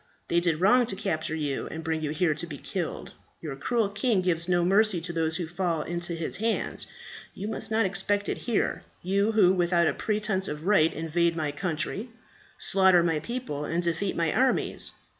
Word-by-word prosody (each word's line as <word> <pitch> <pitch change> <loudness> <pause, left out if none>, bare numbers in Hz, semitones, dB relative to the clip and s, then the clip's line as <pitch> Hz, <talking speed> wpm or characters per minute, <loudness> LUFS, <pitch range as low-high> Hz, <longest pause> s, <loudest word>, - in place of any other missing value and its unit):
They 170 - +3
did 170 -3 0
wrong 240 +6 +4
to 195 - -2
capture 160 -6 -2
you 145 -3 -2
and 160 0 -7
bring 160 -1 -1
you 150 - -2
here 155 +1 +1
to 170 - -4
be 145 -3 -7
killed. 180 +1 -5 0.3
Your 150 -4 -6
cruel 230 - 0
king 205 0 +1
gives 170 -1 +2
no 175 -1 +3
mercy 200 0 +3
to 170 +1 -4
those 160 -1 0
who 175 - -2
fall 170 -2 -1
into 175 0 -3
his 165 -1 -3
hands. 225 +1 -1 0.5
You 205 - -5
must 220 - -3
not 220 -1 +2
expect 195 +2 0
it - - -2
here, 235 -4 -1 0.2
you 200 +4 +1
who 190 -4 +5
without 175 -1 +2
a - - +2
pretence 210 -3 -1
of 150 +2 -5
right 185 -6 +4
invade 165 +2 0
my 155 -3 -1
country, 180 - -3 0.5
slaughter 190 -3 +5
my 165 -2 +1
people, 235 - -4
and 165 +4 -1
defeat 170 +3 0
my 165 -2 0
armies. 260 0 +1
175 Hz, 195 wpm, -27 LUFS, 160-200 Hz, 0.5 s, who